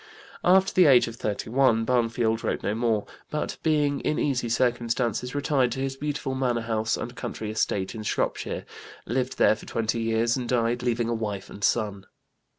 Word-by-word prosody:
After 190 Hz, +2 st, +4 dB
the 180 Hz, -3 st, +6 dB
age 130 Hz, -3 st, +6 dB
of 115 Hz, 0 st, -7 dB
31 115 Hz, +2 st, +1 dB
Barnfield 115 Hz, -2 st, +1 dB
wrote -, -, -2 dB
no 100 Hz, +2 st, 0 dB
more, 110 Hz, -2 st, 0 dB, 0.2 s
but, 150 Hz, -, -3 dB
being 150 Hz, -3 st, +2 dB
in 150 Hz, -, -1 dB
easy 130 Hz, -4 st, 0 dB
circumstances, 120 Hz, +1 st, 0 dB
retired 140 Hz, -3 st, +1 dB
to 130 Hz, -, -5 dB
his 135 Hz, 0 st, -2 dB
beautiful 145 Hz, -1 st, -3 dB
manor 125 Hz, -3 st, 0 dB
house 110 Hz, -1 st, -1 dB
and 120 Hz, +1 st, -6 dB
country 110 Hz, -4 st, -5 dB
estate 100 Hz, -3 st, -1 dB
in 110 Hz, -, -6 dB
Shropshire, 105 Hz, -, -2 dB, 0.4 s
lived 130 Hz, +2 st, -2 dB
there -, -, +5 dB
for 110 Hz, -, -13 dB
twenty 115 Hz, 0 st, -1 dB
years 115 Hz, +1 st, +1 dB
and 125 Hz, -2 st, -4 dB
died 120 Hz, 0 st, +1 dB
leaving 120 Hz, -1 st, 0 dB
a 120 Hz, -, 0 dB
wife 105 Hz, -4 st, -4 dB
and 100 Hz, -, -9 dB
son. 100 Hz, -5 st, 0 dB
120 Hz, 175 wpm, -26 LUFS, 110-130 Hz, 0.4 s, the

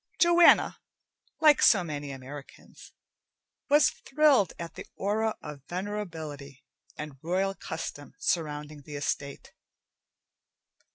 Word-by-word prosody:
Joanna, 345 Hz, 0 st, +5 dB, 0.6 s
like 305 Hz, -3 st, +6 dB
so 195 Hz, -5 st, +6 dB
many 145 Hz, -3 st, -5 dB
Americans, 135 Hz, +1 st, -11 dB, 0.8 s
was 295 Hz, +1 st, +5 dB
thrilled 275 Hz, -, +3 dB
at 170 Hz, -1 st, -7 dB
the -, -, -9 dB
aura 215 Hz, +2 st, 0 dB
of 150 Hz, -2 st, -8 dB
venerability 165 Hz, -8 st, -6 dB, 0.3 s
and 150 Hz, -3 st, -8 dB
royal 190 Hz, +4 st, 0 dB
custom 160 Hz, -5 st, -7 dB
surrounding 150 Hz, -2 st, -2 dB
the 145 Hz, +1 st, -10 dB
estate. 140 Hz, -1 st, -4 dB
165 Hz, 100 wpm, -28 LUFS, 145-205 Hz, 0.8 s, like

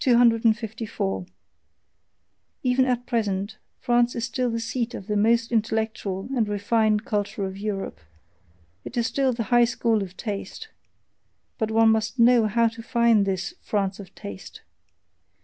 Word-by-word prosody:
254. 225 Hz, -, +1 dB, 1.4 s
Even 255 Hz, +1 st, +3 dB
at 245 Hz, -1 st, -1 dB
present 210 Hz, -3 st, -2 dB, 0.2 s
France 240 Hz, -1 st, +2 dB
is 235 Hz, 0 st, -1 dB
still 250 Hz, +1 st, -1 dB
the 230 Hz, 0 st, -2 dB
seat 230 Hz, +1 st, -3 dB
of 190 Hz, -, -7 dB
the 210 Hz, 0 st, -2 dB
most 230 Hz, +3 st, +2 dB
intellectual 220 Hz, -3 st, -1 dB
and 225 Hz, -4 st, +1 dB
refined 210 Hz, +1 st, +1 dB
culture 205 Hz, -1 st, -2 dB
of 190 Hz, 0 st, -5 dB
Europe, 195 Hz, -, -4 dB, 0.8 s
it 245 Hz, -, -8 dB
is 235 Hz, -, +2 dB
still 265 Hz, +1 st, +1 dB
the 230 Hz, -1 st, -2 dB
high 240 Hz, 0 st, +7 dB
school 230 Hz, -2 st, +1 dB
of 185 Hz, -1 st, -7 dB
taste; 210 Hz, -, -6 dB, 0.9 s
but 220 Hz, -2 st, 0 dB
one 225 Hz, 0 st, +4 dB
must 220 Hz, +2 st, +1 dB
know 235 Hz, -1 st, +5 dB
how 230 Hz, +2 st, +3 dB
to 225 Hz, 0 st, -6 dB
find 230 Hz, -3 st, +3 dB
this 190 Hz, +1 st, -2 dB
"France 195 Hz, -2 st, -1 dB
of 195 Hz, -, -11 dB
taste." 100 Hz, -2 st, -9 dB
225 Hz, 145 wpm, -25 LUFS, 205-235 Hz, 1.4 s, high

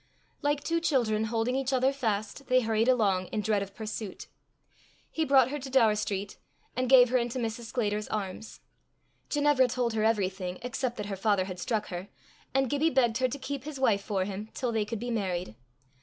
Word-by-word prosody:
Like 290 Hz, 0 st, 0 dB
two 335 Hz, 0 st, +1 dB
children, 230 Hz, -9 st, +1 dB
holding 230 Hz, +2 st, 0 dB
each 270 Hz, 0 st, -1 dB
other 260 Hz, +1 st, +2 dB
fast, 225 Hz, 0 st, -2 dB
they 255 Hz, 0 st, +4 dB
hurried 225 Hz, 0 st, +1 dB
along, 200 Hz, -7 st, +2 dB
in 215 Hz, -, -2 dB
dread 210 Hz, -1 st, +1 dB
of 200 Hz, 0 st, -7 dB
pursuit. 215 Hz, -2 st, -6 dB, 0.9 s
He 320 Hz, -, 0 dB
brought 265 Hz, -2 st, +5 dB
her 295 Hz, -, -3 dB
to 270 Hz, 0 st, -7 dB
Daur 240 Hz, -5 st, +5 dB
street, 205 Hz, -1 st, -3 dB, 0.4 s
and 255 Hz, 0 st, 0 dB
gave 250 Hz, -2 st, +8 dB
her 255 Hz, -, +4 dB
into 240 Hz, +1 st, -2 dB
Mrs. 230 Hz, -1 st, -3 dB
Sclater's 210 Hz, -3 st, -1 dB
arms. 210 Hz, +1 st, -5 dB, 0.7 s
Ginevra 290 Hz, -3 st, +3 dB
told 245 Hz, -1 st, -1 dB
her 215 Hz, -1 st, 0 dB
everything 190 Hz, -4 st, 0 dB
except 250 Hz, 0 st, -2 dB
that 210 Hz, -, -4 dB
her 200 Hz, -1 st, -4 dB
father 195 Hz, -1 st, +1 dB
had 185 Hz, -2 st, -7 dB
struck 215 Hz, +2 st, -1 dB
her, 180 Hz, +1 st, -5 dB, 0.4 s
and 270 Hz, 0 st, +2 dB
Gibbie 290 Hz, +4 st, +2 dB
begged 245 Hz, -5 st, +2 dB
her 255 Hz, -, +3 dB
to 255 Hz, -, -5 dB
keep 275 Hz, -1 st, -5 dB
his 295 Hz, -2 st, -7 dB
wife 215 Hz, -6 st, +3 dB
for 195 Hz, -2 st, -1 dB
him 205 Hz, +2 st, -6 dB
till 250 Hz, -2 st, -1 dB
they 220 Hz, -2 st, 0 dB
could 220 Hz, 0 st, -4 dB
be 240 Hz, +2 st, -4 dB
married. 185 Hz, -, -2 dB
225 Hz, 200 wpm, -29 LUFS, 205-260 Hz, 0.9 s, gave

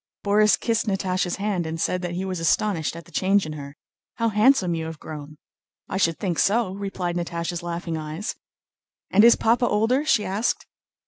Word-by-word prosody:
Borís 210 Hz, +1 st, +4 dB
kissed 230 Hz, -1 st, 0 dB
Natásha's 185 Hz, -2 st, 0 dB
hand 195 Hz, -4 st, -2 dB
and 160 Hz, +1 st, -4 dB
said 180 Hz, +2 st, 0 dB
that 175 Hz, -1 st, -4 dB
he 185 Hz, +2 st, -2 dB
was 185 Hz, -2 st, -3 dB
astonished 165 Hz, 0 st, +1 dB
at 170 Hz, -1 st, -9 dB
the 170 Hz, -, -18 dB
change 195 Hz, +3 st, +2 dB
in 155 Hz, -, -5 dB
her. 140 Hz, 0 st, -9 dB, 0.4 s
"How 230 Hz, -1 st, +1 dB
handsome 210 Hz, -4 st, +3 dB
you 165 Hz, -1 st, -3 dB
have 160 Hz, -1 st, -6 dB
grown!" 150 Hz, -1 st, -9 dB, 0.5 s
"I -, -, -3 dB
should 165 Hz, -4 st, +2 dB
think 180 Hz, -5 st, -2 dB
so!" 210 Hz, -1 st, +2 dB
replied 195 Hz, -3 st, -3 dB
Natásha's 170 Hz, 0 st, -3 dB
laughing 170 Hz, -1 st, -4 dB
eyes. 155 Hz, +6 st, -4 dB, 0.8 s
"And 205 Hz, +3 st, +6 dB
is 235 Hz, 0 st, +8 dB
Papa 240 Hz, +2 st, +2 dB
older?" 225 Hz, +7 st, +2 dB
she 220 Hz, -8 st, +2 dB
asked. 205 Hz, +5 st, -1 dB
185 Hz, 185 wpm, -24 LUFS, 165-210 Hz, 0.8 s, is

